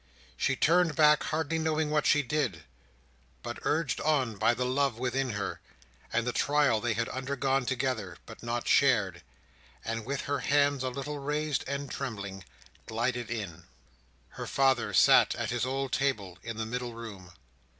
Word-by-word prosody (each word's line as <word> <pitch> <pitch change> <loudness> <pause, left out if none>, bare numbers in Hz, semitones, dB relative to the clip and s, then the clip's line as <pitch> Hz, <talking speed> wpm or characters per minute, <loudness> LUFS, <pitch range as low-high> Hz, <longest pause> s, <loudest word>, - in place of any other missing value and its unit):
She 135 - +1
turned 170 +2 +3
back, 150 0 +6
hardly 160 +1 -1
knowing 160 -1 0
what 150 -1 +2
she 145 - +4
did, 130 - -1 0.8
but - - -5
urged 155 -2 0
on 135 -7 +1
by 110 +4 +2
the 125 - -1
love 130 -1 +1
within 130 0 -1
her, 100 -1 -3 0.5
and 115 +1 +1
the 125 - -1
trial 145 -6 +2
they 120 0 0
had 115 +2 -1
undergone 135 0 -1
together, 125 -8 -2
but - - -11
not 120 0 -3
shared: 115 -9 +3 0.6
and 115 0 -3
with 140 +4 -3
her 145 -1 -2
hands 145 0 +2
a 130 - -1
little 140 +3 -5
raised 150 +1 -1
and 140 +1 -3
trembling, 100 -8 -5 0.4
glided 120 +2 -1
in. 95 -8 -5 0.6
Her - - -7
father 135 -3 +2
sat - - +6
at - - -3
his 120 +1 0
old 135 0 -2
table 105 -10 -1
in 115 -2 -6
the 110 - -2
middle 120 +1 -4
room. 100 -6 -9
130 Hz, 160 wpm, -29 LUFS, 115-140 Hz, 0.8 s, back